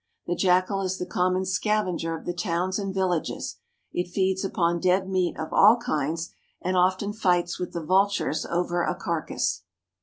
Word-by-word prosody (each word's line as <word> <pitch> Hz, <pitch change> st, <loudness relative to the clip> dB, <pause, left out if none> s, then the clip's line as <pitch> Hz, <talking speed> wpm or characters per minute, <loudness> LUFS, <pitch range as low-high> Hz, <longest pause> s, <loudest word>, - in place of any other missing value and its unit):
The 175 Hz, -, -1 dB
jackal 185 Hz, +2 st, +2 dB
is 190 Hz, 0 st, -2 dB
the 180 Hz, -, -3 dB
common 185 Hz, +1 st, 0 dB
scavenger 185 Hz, -4 st, 0 dB
of -, -, -13 dB
the 175 Hz, -, -2 dB
towns 175 Hz, +2 st, -1 dB
and 195 Hz, -1 st, -3 dB
villages; 185 Hz, -4 st, -2 dB, 0.4 s
it 175 Hz, -, -1 dB
feeds 190 Hz, +1 st, 0 dB
upon 170 Hz, -3 st, +1 dB
dead 185 Hz, +2 st, +2 dB
meat 185 Hz, -2 st, 0 dB
of 160 Hz, -, -5 dB
all 215 Hz, +4 st, +7 dB
kinds, 160 Hz, -, -2 dB, 0.3 s
and 185 Hz, +1 st, -1 dB
often 185 Hz, +3 st, +2 dB
fights 180 Hz, -5 st, +1 dB
with 180 Hz, -, -4 dB
the 170 Hz, -, -4 dB
vultures 195 Hz, -2 st, +2 dB
over 175 Hz, 0 st, 0 dB
a 180 Hz, -, 0 dB
carcass. 170 Hz, -2 st, -2 dB
185 Hz, 170 wpm, -26 LUFS, 175-190 Hz, 0.4 s, all